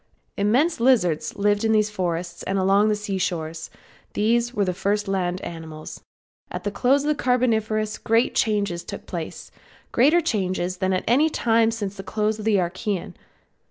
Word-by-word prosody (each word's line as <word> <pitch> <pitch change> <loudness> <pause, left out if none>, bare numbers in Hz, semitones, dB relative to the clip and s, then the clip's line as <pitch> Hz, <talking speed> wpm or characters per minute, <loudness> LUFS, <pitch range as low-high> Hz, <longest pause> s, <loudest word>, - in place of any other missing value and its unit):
Immense 245 +12 +2
lizards 215 -12 +2
lived 205 0 +1
in 220 0 +3
these 215 -1 +2
forests 175 -3 -3
and 195 - -2
along 195 +3 +3
the 210 - +2
sea 205 -2 -3
shores; 165 -3 -3 0.4
these 235 +3 +1
were 210 -5 0
the 180 - -1
first 205 +3 -1
land 185 -2 -1
animals. 160 -2 -8 0.5
At - - -6
the 205 - -2
close 265 +7 +2
of 295 - -1
the 300 - -1
Carboniferous 220 -4 +1
great 225 +2 +2
changes 200 -6 0
took - - -8
place; - - -6 0.4
greater 295 +8 +4
changes 185 - -1
than 190 0 0
at 185 - 0
any 280 +8 +4
time 225 -5 +2
since 205 -3 -4
the 195 - -6
close 215 +2 -1
of 215 - -6
the 220 -2 +3
Archaean. 185 +2 -2
210 Hz, 170 wpm, -23 LUFS, 185-225 Hz, 0.5 s, greater